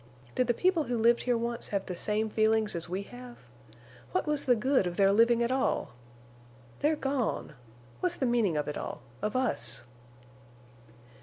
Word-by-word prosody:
Did 255 - +1
the 240 - +2
people 360 -2 +2
who 245 -1 -1
lived 235 +1 +4
here 245 -1 +1
once 235 0 -3
have 200 -2 -2
the 180 - -5
same 210 +4 -1
feelings 220 0 +2
as 170 0 -3
we 190 +3 -2
have? 245 +2 -11 0.8
What - - +1
was 300 -1 -1
the 250 -3 +5
good 250 -3 +2
of 175 - -5
their 195 -1 +5
living 230 +3 +4
at 235 - 0
all? 265 0 0 0.9
They're 305 +2 +2
gone! 270 - -2 0.5
What's 360 -1 0
the 265 - -1
meaning 230 -9 +2
of 150 - -1
it 150 - -3
all—of 125 - -6
us?" 120 - 0
235 Hz, 170 wpm, -30 LUFS, 200-255 Hz, 0.9 s, the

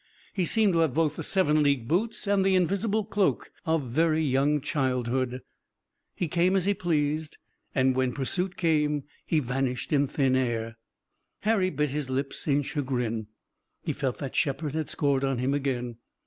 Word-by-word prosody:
He 185 -3 0
seemed 215 0 +3
to 165 - +2
have 160 -5 +2
both 160 -2 +2
the - - -5
seven 155 -6 +2
league 140 -5 +1
boots 215 - 0
and 200 -1 +2
the 190 0 +3
invisible 200 +4 +1
cloak 200 -1 0 0.2
of 160 -2 +2
very 160 +3 +2
young 140 +1 +2
childhood. 130 -2 -1 0.7
He 175 - -1
came 175 +4 +2
as 190 -2 +2
he 205 - +3
pleased, 155 -4 -1 0.4
and 130 -1 +3
when 130 -1 +1
pursuit 180 - -2
came 150 -5 +1 0.2
he 160 - +2
vanished 125 0 -2
in 140 -1 +3
thin 135 -1 +1
air. 115 -3 -1 0.6
Harry 205 -4 +2
bit 150 -3 -1
his 145 -2 -3
lips 135 +3 -3
in 145 0 +2
chagrin. 125 -6 -2 0.6
He - - -1
felt 135 -4 -2
that 135 -3 -6
Shepard 145 +1 0
had 155 -1 -2
scored 140 -3 +1
on 135 -2 0
him 130 +3 0
again. 125 -4 -2
145 Hz, 170 wpm, -27 LUFS, 130-170 Hz, 0.7 s, seemed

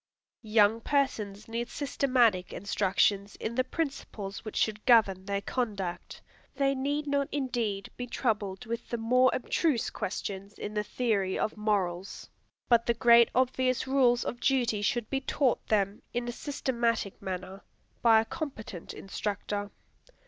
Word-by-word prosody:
Young 215 0 +4
persons 215 -8 -1
need 235 +2 -3
systematic 250 -9 +1
instructions 200 +1 +1
in 220 - -4
the 255 +2 +2
principles 255 -9 -4
which 215 - -7
should 215 -1 0
govern 200 -6 +5
their 200 0 -1
conduct. 195 -9 -3 0.3
They 275 0 +2
need 285 +3 -1
not 280 -1 0
indeed 240 -8 -2
be 245 - -4
troubled 215 -3 -2
with 230 0 -5
the 235 - -2
more 250 +3 +4
abstruse 260 0 0
questions 200 +1 -5
in 210 - -5
the 210 0 0
theory 210 -6 0
of 215 - -1
morals. 195 -4 -2 0.4
But 235 -1 +4
the 235 - +2
great 235 0 +6
obvious 255 0 +1
rules 255 -3 +3
of 240 - -4
duty 245 -6 +1
should 235 +1 0
be 270 -1 0
taught 265 -1 0
them, 200 -1 +1
in 240 0 -1
a - - -1
systematic 235 -6 -2
manner, 190 +1 -5 0.4
by 225 -2 +6
a - - -5
competent 220 - -6
instructor. 205 +1 -4
225 Hz, 140 wpm, -29 LUFS, 200-255 Hz, 0.4 s, great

